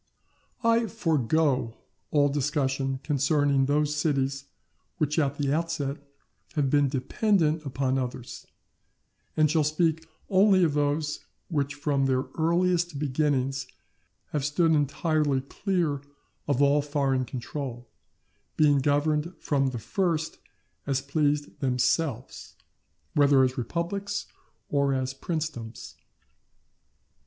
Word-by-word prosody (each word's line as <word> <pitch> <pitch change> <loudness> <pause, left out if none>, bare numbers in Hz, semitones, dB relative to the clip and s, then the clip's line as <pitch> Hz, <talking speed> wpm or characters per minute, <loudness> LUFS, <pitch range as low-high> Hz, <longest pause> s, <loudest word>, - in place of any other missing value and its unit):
I 230 0 +3
forego 150 - +1 0.3
all 145 -1 +3
discussion 135 -2 -1
concerning 140 -1 +2
those 150 +1 +1
cities 140 -2 0 0.5
which 150 -1 +1
at 140 -2 0
the 140 -1 0
outset 150 -4 -1 0.6
have 140 -3 0
been 145 -2 +3
dependent 155 - +1
upon 135 0 0
others, 125 -1 -6 0.9
and 155 -1 +4
shall 155 -1 +3
speak 160 +1 0 0.2
only 190 -1 +5
of 160 -4 +2
those 150 +1 0 0.3
which 145 -3 -1
from 145 -2 0
their 130 -1 +1
earliest 175 0 +1
beginnings 135 -2 0 0.6
have 150 -3 -1
stood 160 +3 +2
entirely 150 -1 +1
clear 160 -1 -1 0.5
of 145 -1 +2
all 140 +1 +4
foreign 140 -3 0
control, 125 -1 -6 0.7
being 145 -2 +5
governed 150 +4 +1
from 135 -2 +1
the 130 -2 -3
first 160 - -1 0.5
as 135 -2 +1
pleased 145 +1 -1
themselves, 130 0 -1 0.6
whether 140 -2 +5
as 130 0 +1
republics 175 - -3 0.4
or 140 -1 +1
as 130 0 -2
princedoms. 135 -7 -5
145 Hz, 110 wpm, -27 LUFS, 135-160 Hz, 0.9 s, only